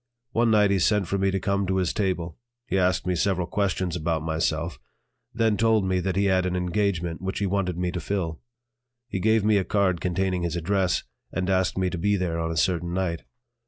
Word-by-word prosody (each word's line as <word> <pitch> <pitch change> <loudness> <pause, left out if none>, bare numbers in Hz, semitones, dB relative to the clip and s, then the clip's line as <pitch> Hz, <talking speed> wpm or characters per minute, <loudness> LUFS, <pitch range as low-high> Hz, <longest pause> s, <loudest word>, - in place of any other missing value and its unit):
One 115 0 +2
night 105 -2 +4
he 100 - +2
sent 105 +1 +2
for 100 +3 -1
me 95 0 +2
to 95 0 0
come 100 0 0
to 95 - 0
his 90 -3 0
table; 90 -4 -2 0.3
he 105 - -2
asked 90 -1 +2
me 90 - +1
several 90 +1 +1
questions 95 -2 -1
about 80 -2 -1
myself; 80 -1 -1 0.5
then 110 -3 +1
told 110 -1 +3
me 95 -1 +1
that 95 +1 -1
he 100 +1 +2
had 95 -1 +2
an 90 - -2
engagement 90 -2 -1
which 95 0 -3
he 100 - 0
wanted 95 -2 -1
me 90 0 -1
to 90 - -3
fill. 85 -5 -3 0.7
He 95 - -2
gave 110 +1 +3
me 105 -1 +4
a - - 0
card 95 -3 +1
containing 90 0 0
his 85 -1 -2
address 95 +2 0 0.3
and 95 0 -1
asked 95 -1 +1
me 95 -1 +1
to 90 - -4
be 100 +3 +2
there 90 -3 -1
on 80 0 -1
a 80 - -3
certain 85 +1 0
night. 90 -3 -2
95 Hz, 220 wpm, -25 LUFS, 85-100 Hz, 0.7 s, night